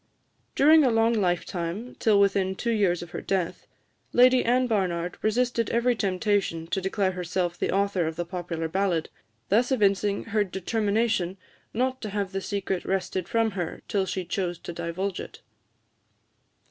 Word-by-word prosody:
During 310 +2 +6
a 260 - +4
long 225 0 +3
lifetime, 180 +2 -2
till 210 -3 +4
within 195 -1 +2
two 235 +4 -1
years 190 -6 +1
of 175 - -12
her - - -5
death, 185 -3 -2 0.5
Lady 255 +1 +6
Anne 250 +2 +3
Barnard 180 -6 -1
resisted 235 +1 +1
every 240 +1 +2
temptation 195 -4 0
to 190 - -1
declare 190 0 0
herself 180 -1 -2
the - - -2
author 195 -3 +1
of 160 - -4
the 175 +1 -3
popular 170 -2 -4
ballad, 175 -1 0 0.4
thus 240 +6 +3
evincing 200 -4 +2
her 215 -1 +1
determination 200 0 0 0.3
not 255 +3 -1
to 215 - -4
have 200 -1 -2
the 195 0 -3
secret 195 -2 -2
wrested 185 -1 -2
from 225 -1 +2
her 175 -4 -5
till 195 -2 0
she 185 0 -3
chose 175 -1 -2
to 175 - -8
divulge 170 +3 -3
it. - - -9
195 Hz, 160 wpm, -26 LUFS, 180-225 Hz, 0.5 s, During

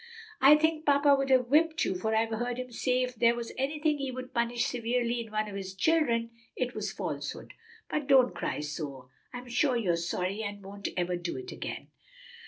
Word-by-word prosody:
I 275 +3 +9
think 315 0 +1
papa 285 -1 +5
would 275 0 -1
have 255 -2 +5
whipped 315 +3 +3
you, - - 0
for 220 +4 -1
I've 225 +1 +1
heard 240 +2 -2
him 255 -1 -5
say 255 +2 +1
if 250 0 -3
there 235 0 +3
was 235 -1 -5
anything 300 +3 0
he 275 -1 -2
would 255 +1 -7
punish 235 -1 0
severely 240 0 -1
in 225 -2 -9
one 215 0 -1
of 205 - -7
his 190 -1 -6
children, 235 - +2 0.2
it 250 -1 -2
was - - -3
falsehood. - - -5 0.3
But 300 -2 -2
don't 260 -3 +5
cry - - -3
so. 140 -4 -6 0.2
I'm 245 0 -8
sure 245 +1 +2
you're 185 -7 +1
sorry 180 +4 -2
and 205 -2 -5
won't 200 +1 -5
ever 180 0 0
do 175 0 -4
it 380 0 -7
again." - - -6
240 Hz, 200 wpm, -29 LUFS, 205-270 Hz, 0.3 s, I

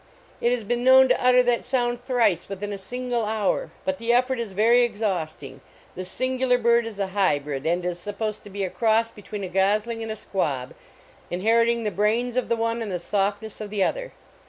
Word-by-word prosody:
It 235 - +2
has 245 -2 -1
been 240 +3 -1
known 260 0 +7
to - - +2
utter 250 0 +6
that 245 -1 +1
sound 245 -1 -1
thrice 240 - +1
within 205 +1 -5
a - - -4
single 245 +3 -3
hour, 220 - -1 0.2
but 285 0 -1
the 230 +1 0
effort 250 +1 +2
is 230 -4 -4
very 225 +5 +4
exhausting. 180 - -2 0.3
This 185 0 -6
sin 255 +5 -2
gular 250 -1 +3
bird 235 0 +3
is 220 -3 -8
a 200 - 0
hybrid, 145 -8 0
and 175 +2 0
is 175 -1 -2
supposed 205 +3 -4
to - - -9
be 200 0 -4
a 185 - -2
cross 225 0 +2
between 210 0 -8
a - - -3
gosling 210 +5 +1
and 225 -1 -4
a - - -3
squab, 145 -12 -3 0.6
inheriting 230 +5 +2
the 210 - -1
brains 220 +6 0
of 255 -2 -1
the 235 - +2
one 230 +1 -1
and 215 -3 -4
the 180 - -1
softness 205 +4 -2
of 210 - -5
the 205 -2 0
other. - - -2
220 Hz, 210 wpm, -24 LUFS, 195-240 Hz, 0.6 s, known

